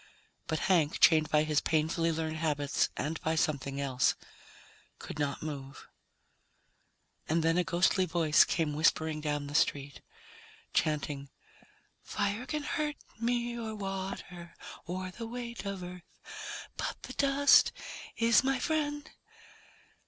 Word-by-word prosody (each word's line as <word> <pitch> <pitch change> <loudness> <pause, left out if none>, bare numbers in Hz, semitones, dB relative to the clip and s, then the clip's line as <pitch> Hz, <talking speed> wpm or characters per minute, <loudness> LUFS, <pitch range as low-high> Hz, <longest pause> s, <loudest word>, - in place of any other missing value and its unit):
But 160 - -1
Hank, 170 -5 +2
chained 155 -2 +6
by 150 -1 +4
his 155 -1 +1
painfully 165 +1 +1
learned 160 0 -2
habits 145 -3 0
and 155 +2 -3
by 160 0 0
something 140 -4 -1
else, 130 -2 +2 0.8
could 150 - -8
not 145 0 -1
move. 140 -3 -7 1.4
And 160 +1 +2
then 165 0 +3
a 180 - +3
ghostly 185 +1 +2
voice 160 -2 +5
came 160 -3 0
whispering 155 0 +1
down 145 -1 -2
the 145 - -7
street, 145 -3 0 0.7
chanting, 145 -2 -1 0.7
"Fire 205 +5 -2
can 300 -1 -2
hurt 300 0 -1 0.2
me, 240 0 0
or 225 -2 -4
water, 190 -3 -6 0.3
or 185 +1 -4
the 230 +4 -7
weight 235 -1 -6
of 195 -2 -4
Earth. 180 0 -8 0.8
But - - -4
the - - -7
dust 280 0 +5 0.5
is 230 0 +5
my 270 0 +1
friend." 295 0 -1
165 Hz, 130 wpm, -31 LUFS, 150-215 Hz, 1.4 s, chained